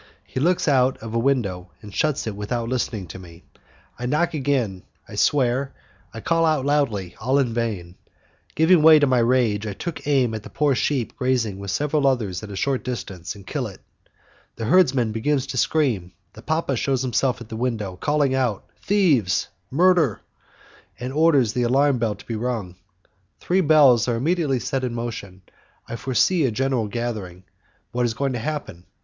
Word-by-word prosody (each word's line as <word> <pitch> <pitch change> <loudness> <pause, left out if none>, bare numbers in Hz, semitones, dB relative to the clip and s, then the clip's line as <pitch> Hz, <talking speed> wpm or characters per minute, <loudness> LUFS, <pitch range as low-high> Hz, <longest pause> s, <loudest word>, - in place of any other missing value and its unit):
He - - -5
looks 175 +5 +1
out 130 -2 +3
of 115 0 -8
a 115 - +1
window 115 -9 0
and 105 -1 -10
shuts 150 +3 0
it 110 -3 -4
without 115 +3 -3
listening 115 -5 -2
to 95 - -8
me, 85 -1 -14 0.6
I 125 - -3
knock 155 +7 +1
again, 130 -10 -1 0.3
I - - -12
swear, 135 -1 +1 0.4
I 115 - -8
call 165 +5 +1
out 155 -4 +2
loudly, 115 -12 0
all 130 +5 +2
in 130 -5 +1
vain, 105 -7 -3 0.6
Giving 160 +2 +5
way 160 0 +8
to 145 - +4
my 130 -2 +2
rage, 115 -3 +2
I 105 - -3
take 165 - -6
aim 130 -5 +2
at 110 -1 -5
a - - -10
poor 150 -2 +1
sheep 130 -2 -1
grazing 125 -7 0
with 100 0 -6
several 145 +6 +1
others 110 -9 0
at 110 - -8
a 100 - -7
short 130 +7 -1
distance, 100 -9 -5
and 100 -2 -13
kill - - -3
it. - - -12 0.8
The 115 - -4
herdsman 130 -7 +3
begins 135 +5 0
to 135 -2 -6
scream, 120 - 0 0.2
the 110 - -12
papa 155 -1 -1
shows 135 +1 0
himself 130 +1 0
at 115 -2 -11
the 110 - -6
window, 110 -6 -2
calling 145 +5 +1
out, 125 -6 -1 0.2
"Thieves! 155 - +2 0.2
Murder!" 165 - +3 0.8
and 125 +2 -5
orders 145 -7 +3
the 125 - 0
alarm 135 +2 +2
bell 110 -3 0
to 100 - -15
be 115 - -4
rung. 110 -6 -3 0.6
Three 185 +2 +1
bells 145 - +5
are 120 - +1
immediately 145 0 0
set 130 +3 -2
in 120 -2 -2
motion, 110 -5 -6 0.4
I - - -5
foresee 135 +8 +1
a - - +1
general 130 -1 0
gathering: 105 -6 -5 0.5
what 125 0 0
is 115 - -4
going 135 +2 -1
to 120 - -3
happen? 115 - -5
125 Hz, 185 wpm, -23 LUFS, 110-140 Hz, 0.8 s, way